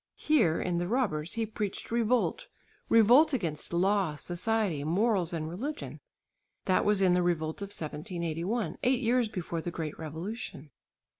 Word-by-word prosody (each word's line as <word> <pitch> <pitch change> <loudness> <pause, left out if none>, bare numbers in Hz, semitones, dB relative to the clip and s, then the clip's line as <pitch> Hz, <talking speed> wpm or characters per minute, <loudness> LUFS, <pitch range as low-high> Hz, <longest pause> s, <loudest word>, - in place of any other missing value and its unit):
Here 230 - +3
(in 175 -2 -1
"The 175 - -1
Robbers") 180 -10 0
he 225 0 -1
preached 210 -1 -5
revolt, 235 +1 +1 0.4
revolt 245 +8 +6
against 165 - -2
law, 185 -2 +2
society, 180 -1 -1
morals 185 +2 +1
and 160 -2 -3
religion. 260 - -5 0.7
That 185 - +2
was 205 -2 +3
in 180 -2 +5
the 180 - +3
revolt 160 -1 -1
of 200 - -3
1781 170 +2 -3
eight 255 +1 +2
years 240 -1 +2
before 170 -4 -4
the 175 - -4
great 160 -3 -5
revolution. 160 - -6
185 Hz, 145 wpm, -30 LUFS, 165-225 Hz, 0.7 s, revolt